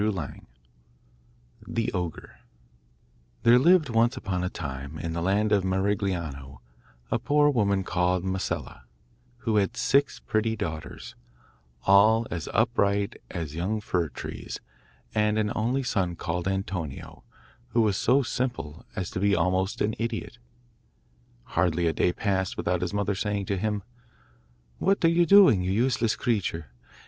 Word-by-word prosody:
] 105 -2 0 1.5
The 115 -1 -2
Ogre 90 -4 -5 1.0
There 120 +1 +7
lived, 170 0 +5
once 120 +3 +2
upon 95 -7 -2
a 90 - -1
time, 70 -2 -6
in 80 +1 -4
the 85 - -2
land 100 +4 +1
of 100 -2 +3
Marigliano, 95 - -2 0.5
a - - +1
poor 145 +4 +3
woman 100 -6 +1
called 90 0 0
Masella, 95 -8 -3 0.6
who 110 -2 +2
had 105 +4 +1
six 140 +4 +2
pretty 110 +1 0
daughters, 80 -8 -6 0.7
all 110 +4 +5
as 85 -3 -4
upright 100 -3 +1
as 80 -5 -5
young 95 +7 -1
fir 90 -6 -1
trees, 65 - -7 0.5
and 105 0 +2
an 105 -1 0
only 125 +5 0
son 90 -8 -1
called 85 +2 -3
Antonio, 95 -6 -4 0.4
who 115 - +1
was 105 -3 +2
so 130 +7 +3
simple 120 - -3
as 90 - -3
to - - -3
be 100 +1 +3
almost 95 +2 0
an 105 +1 +1
idiot. 115 0 -4 1.0
Hardly 85 +3 0
a 80 - +2
day 90 - +2
passed 95 -1 -1
without 90 -1 0
his 90 - -2
mother 100 0 0
saying 100 0 -2
to 100 +1 -1
him, 105 -1 -1 1.0
'What 195 -2 +2
are - - +6
you 170 0 +3
doing, 185 - +7
you 90 +1 -1
useless 115 +1 +1
creature? 85 - -2
100 Hz, 140 wpm, -27 LUFS, 90-115 Hz, 1.5 s, There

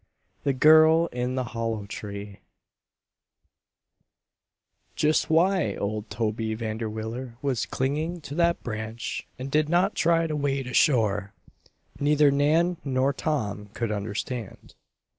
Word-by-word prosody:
THE 140 - +1
GIRL 160 +4 +6
IN 125 +1 -2
THE 130 - 0
HOLLOW 115 -3 -3
TREE 100 0 -7 2.6
Just 155 +1 +2
why 180 +2 +2
old 105 +1 -3
Toby 110 0 -2
Vanderwiller 110 +2 -5
was 135 -5 -1
clinging 155 +6 -2
to 145 - -8
that 170 +2 +1
branch 110 0 -5
and 135 +1 -6
did 155 +1 +2
not 175 +2 +2
try 165 0 +2
to 155 -2 -2
wade 140 -2 -1
ashore, 110 -6 +2 0.7
neither 145 0 +4
Nan 160 +5 +2
nor 135 0 +1
Tom 110 -10 -2
could 115 -2 -2
understand. 105 +2 -5
130 Hz, 115 wpm, -26 LUFS, 110-150 Hz, 2.6 s, GIRL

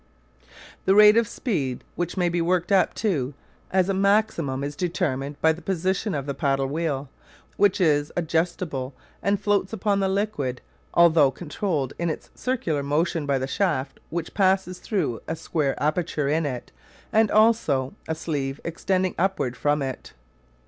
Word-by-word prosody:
The 190 - +4
rate 210 0 +8
of 230 -1 +3
speed 140 - -2
which 175 +2 -3
may 180 -1 +2
be 170 0 0
worked 175 +2 +1
up 195 -1 +3
to 145 - -1 0.3
as 185 -1 +2
a 195 - +1
maximum 190 -9 +1
is 145 +1 -4
determined 145 -5 -2
by 160 0 +5
the 165 - -11
position 190 +1 -1
of 140 -2 -3
the 140 - -2
paddle 135 -2 0
wheel, 145 -1 -2 0.5
which 205 -2 +3
is 150 -4 +2
adjustable 160 -5 -1 0.3
and 200 0 +1
floats 205 0 0
upon 205 -1 +1
the 195 -1 +1
liquid 190 -11 -1 0.4
although 160 -4 +6
controlled 150 -1 -3
in 170 0 0
its 155 - -6
circular 205 - -1
motion 150 +2 0
by 140 -1 +2
the 130 - -2
shaft 145 -4 -1
which 165 0 -4
passes 190 -2 +1
through 165 - -2
a 160 - -2
square 155 -3 -1
aperture 150 -1 0
in 155 +1 +1
it 125 -3 -6 0.4
and 220 -1 +4
also 215 - +3
a 160 - -1
sleeve 140 -4 -3
extending 185 +2 0
upward 175 -10 0
from 145 +2 +1
it. 130 -1 -6
165 Hz, 160 wpm, -25 LUFS, 140-190 Hz, 0.5 s, rate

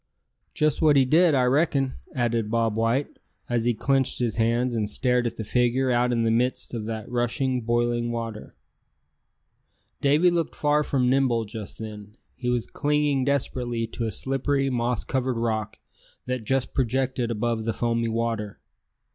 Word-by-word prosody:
"Just 155 0 +1
what 155 -2 +5
he 135 -1 +5
did, 160 +3 +4
I 130 - +3
reckon!" 135 0 +2 0.2
added 115 -3 0
Bob 115 -1 +1
White, 115 +5 0 0.3
as 120 -1 0
he 120 -1 +2
clenched 135 +3 +1
his 120 -3 -1
hands, 120 +2 +1
and 105 -2 -1
stared 125 +2 +1
at - - -5
the 110 - -5
figure 125 +3 +1
out 125 0 +2
in 115 -1 +1
the 115 - +2
midst 125 +3 0
of 110 -3 -4
that 110 -1 -5
rushing, 125 +1 0
boiling 120 0 0
water. 115 -2 -5 1.5
Davy 150 +6 +4
looked 170 -1 -1
far 150 0 +2
from 135 -4 0
nimble 125 -3 +2
just 105 -1 -8
then. 105 -1 -9 0.2
He 125 -1 -3
was 120 -2 0
clinging 145 -3 0
desperately 125 -4 -1
to 115 +1 -4
a 110 - -2
slippery 135 +2 0
moss 120 -2 0
covered 130 -2 -1
rock 110 -2 -2 0.5
that 125 -3 -3
just 135 +2 0
projected 130 -1 0
above 115 0 -1
the 115 - 0
foamy 115 -1 0
water. 115 -2 -2
120 Hz, 165 wpm, -25 LUFS, 115-135 Hz, 1.5 s, what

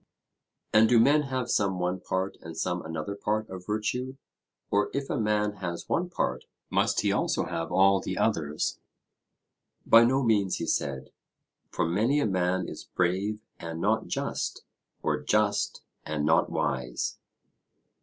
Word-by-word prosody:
And 110 +1 +6
do 120 - +6
men 145 +6 +5
have 130 -2 -1
some 95 -2 +1
one 90 +1 -1
part 95 +1 -2
and 80 -1 -9
some 90 +2 -1
another 80 +4 -4
part 105 +2 -1
of 90 -1 -8
virtue? 115 +5 -2 0.6
Or 100 +1 +2
if 140 -1 -2
a 145 - 0
man 105 -1 +1
has 85 -3 -5
one 180 +1 0
part, 65 - -2 0.3
must - - +2
he - - +1
also - - 0
have 80 0 -4
all 95 +1 +5
the - - -4
others? 75 -1 0 1.1
By 115 +1 +8
no 130 +3 +3
means, 105 -5 +2
he - - -3
said; 65 -2 -2 0.6
for - - -1
many 110 - +2
a 145 - +2
man 95 -1 0
is - - -7
brave 100 +5 -1 0.2
and 85 -1 -6
not - - +1
just, - - -3 0.4
or - - 0
just 105 -1 +1 0.2
and 75 -1 -2
not 80 +1 +3
wise. 65 -2 -2
100 Hz, 155 wpm, -28 LUFS, 85-110 Hz, 1.1 s, By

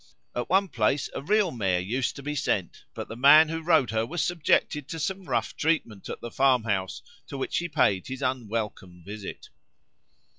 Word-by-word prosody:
At 120 - -3
one 195 +3 +3
place 130 0 0
a - - -4
real 200 +3 +2
mare 95 -8 0
used 115 +8 -2
to 140 - -9
be 150 +1 -3
sent, 100 -10 -2
but - - -5
the 115 - -7
man 150 +5 +7
who 165 0 -3
rode 160 - +3
her 110 0 +1
was 160 +8 -2
subjected 150 -4 +1
to 165 - -6
some 190 +4 -3
rough - - -1
treatment 145 - -1
at - - -6
the 120 - -7
farmhouse 115 -8 +1 0.2
to 140 - -7
which 135 - -1
he 175 0 -4
paid 100 - +1
his 130 +1 -6
unwelcome 110 -8 -3
visit. 105 0 -8
130 Hz, 185 wpm, -26 LUFS, 110-160 Hz, 0.2 s, man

